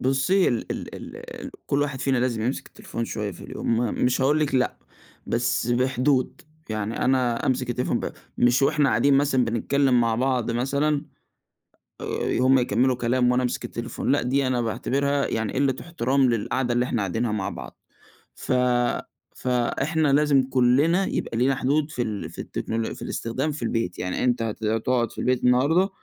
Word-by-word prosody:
بُصّي 135 +9 +2
ال 120 - -2
ال - - -7 0.2
ال - - -9 0.2
كلّ 140 +1 +1
واحد 140 -3 -3
فينا 135 -2 +1
لازم 120 -3 0
يمسك 125 +4 -2
التليفون 115 - -6
شوية 105 -2 -3
في - - -12
اليوم 115 - -2
م 120 +1 0
مش 125 +1 +2
هاقول 145 +3 +3
لِك 145 -3 0
لأ، 125 -1 +1 0.5
بس 120 0 0
بحدود 130 +2 +1 0.3
يعني 110 0 -2
أنا 125 -3 +1
أمسك 125 -1 0
التليفون 125 +1 -1
ب - - -4 0.3
مش 120 +2 +3
وإحنا 145 0 +3
قاعدين 135 +4 +3
مثلًا 135 -2 +3
بنتكلّم 125 +3 +2
مع 115 -1 +2
بعض 125 -1 0
مثلًا، 140 +5 0 1.0
آآ - - -2
هُم 130 +1 +5
يكمّلوا 125 +1 +2
كلام 125 +1 +1
وأنا 125 +1 +1
أمسك 125 - -2
التليفون، 120 +3 -3
لأ 145 - +3
دي 135 +2 +1
أنا 125 -2 +1
باعتبرها 140 +5 0
يعني 110 -2 -2
قلة 135 -1 +1
إحترام 135 -5 +1
للقعدة 120 +2 0
اللي 120 +1 +1
إحنا 120 -4 -1
قاعدينها 110 +4 -1
مع 105 -3 -2
بعض، - - -9 0.6
ف - - -3 0.8
فإحنا 135 +5 0
لازم 145 -2 +4
كلّنا 140 +9 +3
يبقى 115 - -3
لينا 135 +2 +2
حدود 145 +4 0
في 125 - -3
ال 105 -4 -3
في - - -7
التكنولو 115 0 -3
في - - -13
الإستخدام 130 +7 -2
في 145 -4 -6
البيت، 115 -6 -2
يعني 90 0 -2
أنت 125 -1 +1
هت 110 -1 -4
هتقعد 115 +2 0
في - - -16
البيت 125 -1 0
النهارده، 145 +10 +3
125 Hz, 175 wpm, -24 LUFS, 120-140 Hz, 1.0 s, هُم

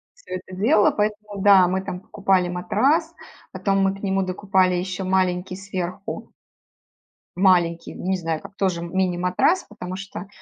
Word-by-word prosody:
Всё - - -11
это 185 - -6
дело. 210 +1 +4
Поэтому 210 -1 -2
да, 190 -3 +7
мы 190 +1 0
там 180 -1 -6
покупали 190 -3 +1
матрас, 270 - +1 0.4
потом 195 -1 0
мы 195 0 +2
к 195 - -15
нему 195 -1 +1
докупали 185 0 +1
еще 185 +1 -3
маленький 185 -1 0
сверху 190 0 -6 1.0
маленький, 175 -3 +2
ну, - - -8
не 190 - +2
знаю 165 -2 -3
как, 200 - -12
тоже 185 -4 0
мини-матрас, 180 - +1
потому 185 -3 -7
что 195 0 -7
190 Hz, 150 wpm, -23 LUFS, 180-200 Hz, 1.0 s, да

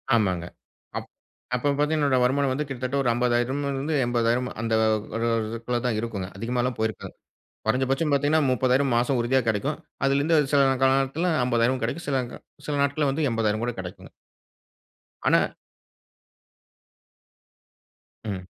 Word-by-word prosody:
ஆமாங்க. 95 -6 +1 0.5
அப் - - -5 0.5
அப்ப 125 - -3
பார்த்தீங்கனா 150 +2 +1
என்னோட 140 -3 +3
வருமானம் 135 +2 +2
வந்து 150 +3 -2
கிட்டத்தட்ட 130 +1 -2
ஒரு 125 - +2
ரூ.50,000 120 +3 0
இருந்து 140 +3 -2
80,000 120 +1 +1
அந்த 115 -1 -1 0.4
ஒரு 115 +1 0 0.2
இதுக்குல்ல 115 +2 -2
தா 125 - +2
இருக்குங்க. 105 -5 -4
அதிகமலா 120 +3 -1
போயிருக்காதுங்க. 110 0 -4 0.5
குறஞ்சபட்ச 130 +5 +1
பாத்தீங்கனா 145 +3 +3
30,000 130 +2 +2
மாச 120 +3 +2
உறுதியா 130 +3 +2
கெடைக்கும். 120 +8 0 0.3
அதிலிருந்து 140 +4 +3 0.2
சில 140 - +6 0.2
காலத்தில 135 +5 +2 0.2
50,000 125 +1 +1
கெடைக்கும். 145 +9 -3
சில 135 -2 +1
க - - -9 0.3
சில 150 - -1
நாட்கள்ல 140 +1 +1
வந்து 150 +1 0
80 110 -1 0
கூட 120 - -2
கெடைக்குங்க. 90 -1 -8 1.2
ஆனா. - - +5 2.8
ம். 100 -4 -5
125 Hz, 130 wpm, -25 LUFS, 115-140 Hz, 2.8 s, சில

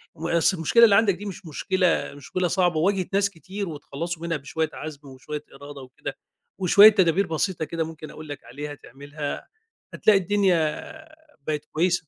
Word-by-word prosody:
ما 165 +1 -1
أصل 175 +3 +3
المشكلة 165 +9 +4
اللي 215 -3 +7
عندك 205 -1 +4
دي 200 +4 -9
مش 195 -2 -7
مشكلة، 180 +3 0
مشكلة 160 +6 -2
صعبة 175 -1 +1
وواجهِت 185 +3 0
ناس 200 0 +3
كتير 195 +2 -6
واتخلّصوا 160 +2 -6
منها 170 -2 -1
بشوية 155 +3 -2
عَزم 150 -2 -8
وشوية 140 +3 -7
إرادة 145 -1 -10
وكده، 130 -1 -8 0.4
وشوية 200 +3 +8
تدابير 190 -2 +2
بسيطة 165 +1 -1
كده 165 +2 -2
ممكن 160 -1 -8
أقول 155 -1 -11
لك 145 - -7
عليها 145 +3 -7
تعملها، 145 +2 -7 0.5
هتلاقي 210 -2 +4
الدنيا 190 -1 +2 0.9
بقِت 150 -1 -2
كويسة. 175 0 0
165 Hz, 165 wpm, -24 LUFS, 150-190 Hz, 0.9 s, وشوية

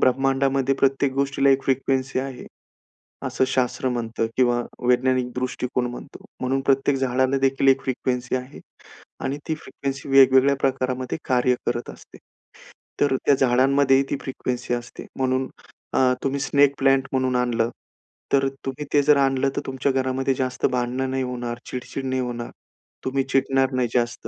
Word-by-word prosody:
ब्रह्मांडामध्ये 135 +1 +2
प्रत्येक 135 0 +1
गोष्टीला 140 0 +2
एक 135 0 +3
फ्रिक्वेन्सी 135 0 0
आहे, 135 -2 -7 0.8
असं - - +1
शास्त्र 130 0 0
म्हणतं 115 -2 -2
किंवा 120 -1 +2 0.2
वैज्ञानिक 125 0 +2
दृष्टिकोन 125 0 -2
म्हणतो. 120 - -10 0.2
म्हणून 130 +1 0
प्रत्येक 135 0 +2
झाडालादेखील 135 +1 +1
एक 135 0 +5
फ्रिक्वेन्सी 125 -1 -2
आहे 130 +2 -8 0.6
आणि 140 +2 -2
ती 160 - +1
फ्रिक्वेन्सी 140 -3 -6
वेगवेगळ्या 135 0 +6
प्रकारामध्ये 130 +1 -1
कार्य 125 0 +3
करत 120 0 -2
असते. - - -15 0.8
तर 145 -2 +3
त्या 145 - +5
झाडांमध्येही 135 +1 +3
ती - - 0
फ्रिक्वेन्सी 125 -2 -3
असते. 120 0 -6
म्हणून 130 0 0 0.5
अ, - - +2 0.2
तुम्ही 140 +1 -1
स्नेक 140 0 +3
प्लांट 135 -1 +3
म्हणून 130 -1 0
आणलं, 120 -2 +1 0.6
तर 135 0 +4 0.2
तुम्ही 135 +3 -4
ते 145 - +5
जर 150 0 +5
आणलं, 135 0 +2
तर - - -1
तुमच्या 135 +1 0
घरामध्ये 130 0 0
जास्त 130 -1 -2
भांडणं 125 +1 -1
नाही 130 0 -1
होणार, 120 -1 -4
चिडचिड 130 +1 -5
नाही 130 0 -1
होणार. 120 -1 -5 0.5
तुम्ही 135 +1 0
चिडणार 135 0 +2
नाही 125 -1 +1
जास्त. 120 -1 -1
130 Hz, 145 wpm, -23 LUFS, 125-135 Hz, 0.8 s, वेगवेगळ्या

